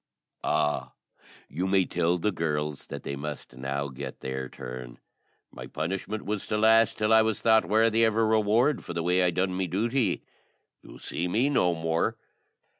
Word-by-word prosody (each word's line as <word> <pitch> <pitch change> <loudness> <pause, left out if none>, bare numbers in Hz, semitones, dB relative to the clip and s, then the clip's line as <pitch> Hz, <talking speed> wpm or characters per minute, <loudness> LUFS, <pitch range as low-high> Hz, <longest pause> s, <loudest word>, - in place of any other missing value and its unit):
"Ah, 75 0 0 0.5
you 90 +6 -3
may 95 -1 +3
tell 85 0 +1
the 105 +5 0
girls 75 -4 -3
that - - -7
they 70 - -4
must 75 -2 -7
now 70 +2 -3
get 65 +1 -8
their 65 0 -4
turn. 60 -1 -8 0.5
My - - -9
punishment 95 +6 -4
was 105 -1 -3
to 105 - 0
last 110 +1 +4
till 110 +1 +2
I 110 - +7
was 110 -1 0
thought 110 -4 +4
worthy 115 +1 +3
of 110 -1 +1
a 115 - +3
reward 110 +6 +2
for 85 - -7
the 85 - -1
way 90 +2 +2
I 90 - +3
done 95 +2 0
my 95 0 -1
duty. 115 +8 0 0.6
You'll - - -13
see 85 - -3
me 120 +10 +1
no 90 -10 +2
more." 80 0 -1
90 Hz, 180 wpm, -27 LUFS, 75-110 Hz, 0.6 s, I